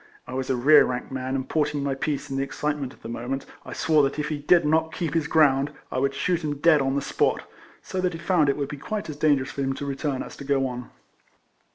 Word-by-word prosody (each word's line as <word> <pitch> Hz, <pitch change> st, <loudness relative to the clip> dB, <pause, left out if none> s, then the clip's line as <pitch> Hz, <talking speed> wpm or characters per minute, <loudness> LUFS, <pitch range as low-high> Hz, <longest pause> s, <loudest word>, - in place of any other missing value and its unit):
I -, -, -8 dB
was 130 Hz, 0 st, -3 dB
a 130 Hz, -, +2 dB
rear 145 Hz, +5 st, +7 dB
rank 125 Hz, +1 st, -3 dB
man, 130 Hz, 0 st, -3 dB
and 130 Hz, -1 st, -2 dB
porting 150 Hz, -2 st, 0 dB
my 140 Hz, -1 st, 0 dB
piece, 140 Hz, +1 st, -2 dB
in -, -, -2 dB
the 135 Hz, -, 0 dB
excitement 140 Hz, 0 st, -2 dB
of -, -, -19 dB
the -, -, -6 dB
moment 120 Hz, +4 st, -4 dB, 0.2 s
I -, -, -8 dB
swore 155 Hz, -2 st, +3 dB
that 135 Hz, +1 st, 0 dB
if 150 Hz, 0 st, -2 dB
he 150 Hz, -2 st, -2 dB
did 170 Hz, +3 st, +4 dB
not 160 Hz, +1 st, +2 dB
keep 165 Hz, -4 st, -2 dB
his 165 Hz, -3 st, +1 dB
ground, 140 Hz, -3 st, +3 dB, 0.2 s
I -, -, -1 dB
would 135 Hz, +1 st, 0 dB
shoot 175 Hz, -2 st, 0 dB
him 145 Hz, -1 st, -2 dB
dead 155 Hz, 0 st, +5 dB
on 135 Hz, 0 st, 0 dB
the 140 Hz, -, 0 dB
spot -, -, +1 dB
;x -, -, -19 dB, 0.4 s
so 185 Hz, -, -1 dB
that 180 Hz, -1 st, 0 dB
he -, -, -5 dB
found 170 Hz, -4 st, +2 dB
it 140 Hz, -, +1 dB
would 140 Hz, -2 st, -2 dB
be 145 Hz, 0 st, -7 dB
quite 205 Hz, +4 st, -4 dB
as -, -, -8 dB
dangerous 145 Hz, -3 st, +2 dB
for 140 Hz, -, -4 dB
him 135 Hz, 0 st, 0 dB
to 140 Hz, -, -5 dB
return 140 Hz, -1 st, -2 dB
as -, -, -10 dB
to -, -, -8 dB
go 135 Hz, -1 st, +1 dB
on. 125 Hz, -1 st, -5 dB
140 Hz, 270 wpm, -25 LUFS, 135-155 Hz, 0.4 s, rear